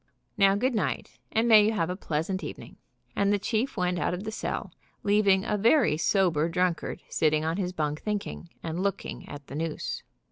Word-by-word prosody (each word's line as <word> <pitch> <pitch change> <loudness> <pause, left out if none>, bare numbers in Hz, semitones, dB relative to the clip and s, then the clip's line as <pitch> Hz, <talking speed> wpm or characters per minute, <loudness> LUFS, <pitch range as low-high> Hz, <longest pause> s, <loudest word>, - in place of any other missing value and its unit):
Now, 195 0 +5
good 250 +5 +1
night, 215 - -2
and 225 +2 +2
may 215 -2 +8
you 215 +2 +2
have 170 -4 0
a - - -3
pleasant 185 +1 -2
evening/' - - -8 0.4
and 200 0 +2
the 205 - +3
chief 220 +5 -1
went 180 -1 0
out 175 - 0
of 185 - -6
the 220 - -4
cell, - - -4 0.3
leaving 200 -1 +3
a 210 - 0
very 230 - +4
sober 165 -2 +2
drunkard 180 0 -1
sitting 155 0 +1
on 165 +2 0
his 185 -3 -1
bunk 150 -3 -2
thinking, 205 -4 -4
and 165 +2 -3
looking 195 -1 -3
at 145 -1 -8
the - - -11
noose. 155 +1 -3
190 Hz, 190 wpm, -28 LUFS, 165-210 Hz, 0.4 s, may